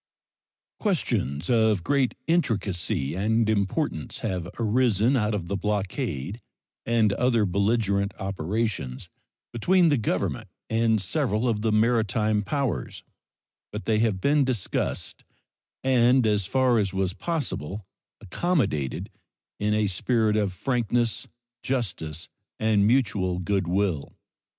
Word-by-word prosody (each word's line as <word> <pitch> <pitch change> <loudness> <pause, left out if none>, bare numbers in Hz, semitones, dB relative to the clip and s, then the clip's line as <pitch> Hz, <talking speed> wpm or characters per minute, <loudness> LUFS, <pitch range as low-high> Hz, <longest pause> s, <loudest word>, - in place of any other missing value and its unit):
Questions 100 - -1
of 110 -6 +3
great 135 +2 +1
intricacy 100 - 0
and 110 +5 +1
importance 100 - -1
have 90 -6 -3
arisen 115 +1 +2
out 105 -3 +1
of 90 -4 -4
the 100 - -2
blockade 100 - -2 0.5
and 115 -3 +3
other 120 -1 +2
belligerent 100 +1 +1
operations 95 - -3 0.4
between 175 - +3
the 145 -4 +2
Government 105 - -2 0.2
and 110 -1 +2
several 115 - 0
of 110 -3 0
the 110 0 +1
maritime 110 -1 +2
powers, 135 +4 -2 0.7
but 105 +1 -6
they 110 -1 +2
have 110 -4 +1
been 145 +7 +3
discussed 125 -7 -2 0.6
and, 125 -1 +4
as 105 -3 +1
far 130 0 +3
as 100 -2 -1
was 95 -1 0
possible, 110 - -3 0.3
accommodated 95 - -1 0.5
in 105 +1 +1
a 110 0 +2
spirit 110 +3 +1
of 105 -3 +1
frankness, 120 +3 -1 0.3
justice, 90 - -3 0.3
and 105 -2 +3
mutual 105 -7 +1
good 95 0 -1
will. 90 -5 -1
110 Hz, 115 wpm, -26 LUFS, 95-120 Hz, 0.7 s, and